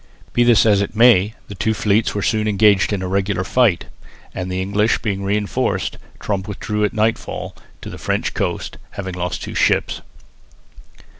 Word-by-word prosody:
Be 120 - +3
this 120 -2 +5
as 105 -2 +4
it 100 - -3
may, 110 -3 +5
the - - -8
two 110 +3 -1
fleets 105 +1 +1
were 100 - -1
soon 110 -1 +1
engaged 105 -1 +3
in 100 -2 -2
a - - -2
regular 95 0 0
fight, 115 -3 +2 0.5
and, 90 0 -4
the 90 - -2
English 100 +4 +1
being 100 -3 -2
reinforced, 105 +1 -1 0.2
Tromp 100 -1 -3
withdrew 105 +1 -3
at 105 - +1
nightfall 110 +1 -2 0.3
to - - -7
the - - -9
French - - -1
coast, - - -3 0.2
having 95 -2 -5
lost 90 0 -4
two - - -6
ships. - - +1
105 Hz, 170 wpm, -19 LUFS, 95-110 Hz, 0.5 s, this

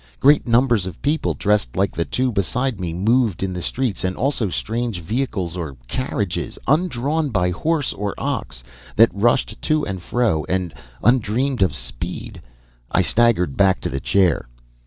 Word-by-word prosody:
Great 145 0 +5
numbers 120 -5 +3
of 90 - -8
people, 150 +3 0
dressed 105 -12 0
like 100 0 +2
the 85 - 0
two 130 0 0
beside 120 +3 -1
me, 90 -2 -3
moved 110 +3 +1
in 95 -1 -2
the 90 - -4
streets 125 +1 -1
and 95 0 -1
also 125 -6 0
strange 115 +1 -2
vehicles 95 -3 -2
or 80 -7 -5
carriages, 105 - -3
undrawn 150 0 +1
by 90 -6 +1
horse 150 - 0
or 100 -1 -3
ox, - - -4 0.3
that 115 -4 +6
rushed 110 +2 +1
to 155 -1 +1
and 95 -1 -4
fro 105 -7 0
at 90 -3 -1 0.3
undreamed 125 +2 +2
of 95 - +3
speed! - - -5 0.5
I - - +3
staggered 105 - +2
back 95 -1 +3
to - - -2
the 70 - -3
chair. 90 -4 +2
105 Hz, 160 wpm, -21 LUFS, 90-125 Hz, 0.5 s, that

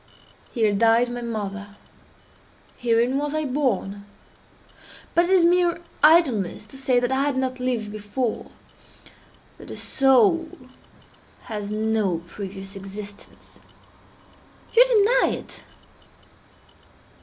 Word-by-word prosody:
Here 220 -4 +1
died 230 +3 +3
my 245 0 -5
mother. 205 -3 -5 1.0
Herein 240 +3 +1
was 295 +1 -3
I 310 0 -1
born. 230 -8 -2 1.1
But 345 - +4
it - - -4
is 370 -3 +5
mere 350 0 +3 0.2
idleness 265 - +3
to - - -10
say 260 -2 +2
that 245 +1 -1
I 265 +1 +1
had 280 -1 0
not 260 -1 -2
lived 240 -4 -2
before—that 215 +3 -8
the - - -8
soul 315 +6 +3 0.9
has 210 -3 -6
no 215 -5 -1
previous 195 +2 -8
existence. 200 +1 -11 1.2
You 480 - +9
deny 480 +1 +3
it? - - -11
240 Hz, 105 wpm, -23 LUFS, 205-290 Hz, 1.2 s, You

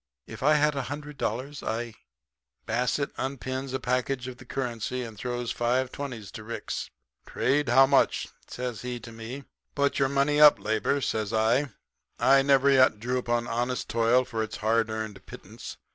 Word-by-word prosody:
If - - -10
I 150 +3 +5
had 150 0 +3
a 140 - -2
hundred 145 0 -7
dollars 135 +6 -3
I 115 +1 -3 0.4
' 65 -1 -54
"Basset 125 +5 0
unpins 130 0 -3
a 130 - -2
package 125 +1 -1
of 125 -1 -7
the 130 - -13
currency 125 -1 -3
and 115 -2 -8
throws 120 +2 -3
five 125 +2 0
twenties 120 -8 -6
to 110 - -8
Ricks. 115 +2 -5 0.4
"'Trade, 140 0 +1
how 135 +3 +7
much?' 135 0 +3
he - - -9 0.2
says 125 -3 -5
to 120 -2 -6
me. 115 +5 -7 0.3
"'Put 140 0 +1
your 135 -1 +3
money 140 +2 +2
up, 150 -1 +9
Labor,' 110 +6 0
says 110 -4 -1
I. 115 +6 +2 0.5
'I 135 +3 +5
never 140 0 +4
yet 130 -5 +5
drew 125 +3 -1
upon 120 -1 -1
honest 120 +2 -2
toil 115 +2 +3
for 115 -2 -3
its 110 -1 -4
hard 110 +1 +1
earned 110 -3 -5
pittance. - - -10
125 Hz, 175 wpm, -27 LUFS, 115-135 Hz, 0.5 s, up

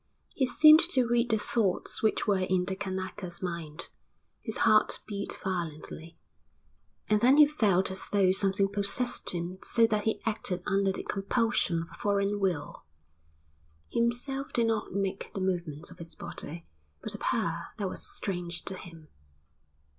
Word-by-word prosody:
He 265 - +1
seemed 310 +3 +8
to 255 -7 +2
read 240 0 +1
the 220 - +3
thoughts 210 -3 -1
which 220 - +1
were 200 -3 +2
in 185 -1 0
the 190 - -2
Kanaka's 190 -2 -5
mind. 170 -4 -5 0.5
His 220 - -3
heart 215 -1 +4
beat 200 -1 -4
violently. 165 -2 -5 0.9
And 210 0 +2
then 260 +4 +5
he 300 - +9
felt 205 -11 +1
as 190 - -3
though 195 -3 +3
something 195 +1 +3
possessed 205 +5 -1
him 175 +1 -4
so 230 -1 +4
that 215 -2 0
he 220 - 0
acted 195 -5 -2
under 195 -1 +1
the - - -5
compulsion 195 -4 0
of - - -11
a - - -14
foreign 200 0 0
will. 175 -7 -2 1.1
Himself 245 +5 0
did 235 - +2
not 225 -2 -1
make 195 0 -3
the - - -2
movements 175 -5 -3
of - - -14
his 165 0 -6
body, 165 +3 -2 0.4
but - - 0
a - - -6
power - - -1
that 200 - -2
was - - -6
strange 175 -3 -2
to 195 - -2
him. 165 -4 -12
195 Hz, 160 wpm, -29 LUFS, 180-220 Hz, 1.1 s, he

